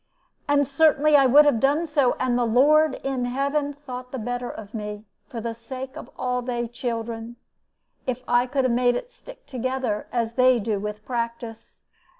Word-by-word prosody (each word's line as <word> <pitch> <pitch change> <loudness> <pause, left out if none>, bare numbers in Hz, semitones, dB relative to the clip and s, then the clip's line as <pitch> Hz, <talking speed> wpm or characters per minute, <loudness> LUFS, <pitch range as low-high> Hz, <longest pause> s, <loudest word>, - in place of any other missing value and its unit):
And 285 0 +3
certainly 300 +1 +4
I 275 -2 +6
would 290 +4 +7
have 285 -6 +3
done 285 +7 +2
so, 290 -5 +2
and 255 -1 +1
the 245 - +2
Lord 280 +5 +4
in 265 -2 -1
heaven 280 +3 -1
thought 255 -3 -9
the 265 - -4
better 245 +1 -3
of 210 -1 -9
me, 210 -1 -6 0.2
for 230 - -6
the 230 +1 -3
sake 260 +3 -8
of - - -9
all 250 -1 -1
they 240 -1 -2
children, 230 -1 -5 0.7
if 255 0 -2
I 245 +1 +3
could 270 +1 0
have 255 -2 +2
made 245 0 +3
it 480 - -5
stick - - -14
together, 255 -4 -2
as 230 -2 -1
they 255 0 +4
do 210 -1 -1
with 210 +1 -6
practice." 230 -2 -5
250 Hz, 180 wpm, -24 LUFS, 230-275 Hz, 0.7 s, would